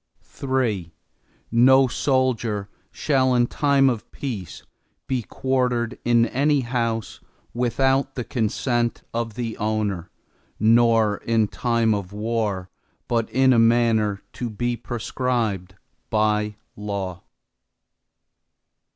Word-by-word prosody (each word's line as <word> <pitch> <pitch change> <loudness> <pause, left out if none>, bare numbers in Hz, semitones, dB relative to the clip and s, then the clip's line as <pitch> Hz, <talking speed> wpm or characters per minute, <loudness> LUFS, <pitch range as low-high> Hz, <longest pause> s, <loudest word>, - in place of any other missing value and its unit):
III 120 -11 -1 0.6
No 130 +3 +6
soldier 120 -6 0 0.2
shall, 130 -3 +1
in 120 -1 +4
time 140 +1 +2
of 120 -5 -2
peace 100 - -6 0.4
be 130 -2 -1
quartered 125 -1 -1
in 120 -1 +4
any 140 +4 +1
house, 115 -3 -2 0.3
without 135 +3 +1
the 125 - -3
consent 120 0 -1
of 115 -2 -3
the 115 -2 -3
owner, 105 -4 -2 0.5
nor 115 -1 +4
in 115 -2 +1
time 115 0 +1
of 100 -3 -4
war, 105 -3 -2 0.4
but 115 -2 0
in 130 +1 +4
a 115 - +4
manner 115 -3 +2
to 120 - -4
be 120 +3 -2
prescribed 115 -6 -2 0.3
by 105 -1 +1 0.2
law. 100 -3 -4
115 Hz, 105 wpm, -23 LUFS, 105-125 Hz, 0.6 s, No